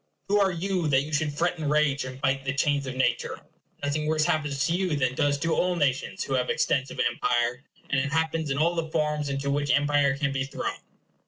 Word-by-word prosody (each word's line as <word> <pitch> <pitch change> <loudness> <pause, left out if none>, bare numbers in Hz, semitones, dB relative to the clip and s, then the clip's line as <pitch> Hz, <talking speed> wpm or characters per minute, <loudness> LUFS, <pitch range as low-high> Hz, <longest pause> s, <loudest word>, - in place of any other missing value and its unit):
Who 205 +1 +4
are 195 -1 +4
you, 180 -1 -1
that 135 -2 +3
you 155 +2 -8
should 150 +1 +1
fret 170 +3 -1
and 150 -2 -1
rage, 145 -2 +2
and 130 0 -8
bite 135 -1 0
the 135 0 -2
chains 140 -1 +1
of 130 - -4
nature? 130 - 0 0.4
Nothing 150 +2 -1
worse 155 0 +2
happens 145 -3 0
to 165 - +1
you 180 -3 0
than 130 -3 +1
does 145 +1 +1
to 165 +3 0
all 180 0 +1
nations 140 -6 0
who 135 - -4
have 125 -1 0
extensive 135 -1 0
empire; 120 +1 0 0.3
and 140 -2 +1
it 140 +1 -2
happens 160 0 0
in 135 - -1
all 165 +4 +2
the 165 -2 -2
forms 150 -2 -1
into 140 0 -1
which 145 0 -1
empire 145 -1 +3
can 140 -1 0
be 135 -1 -1
thrown. 135 - -3
145 Hz, 225 wpm, -26 LUFS, 135-160 Hz, 0.4 s, Who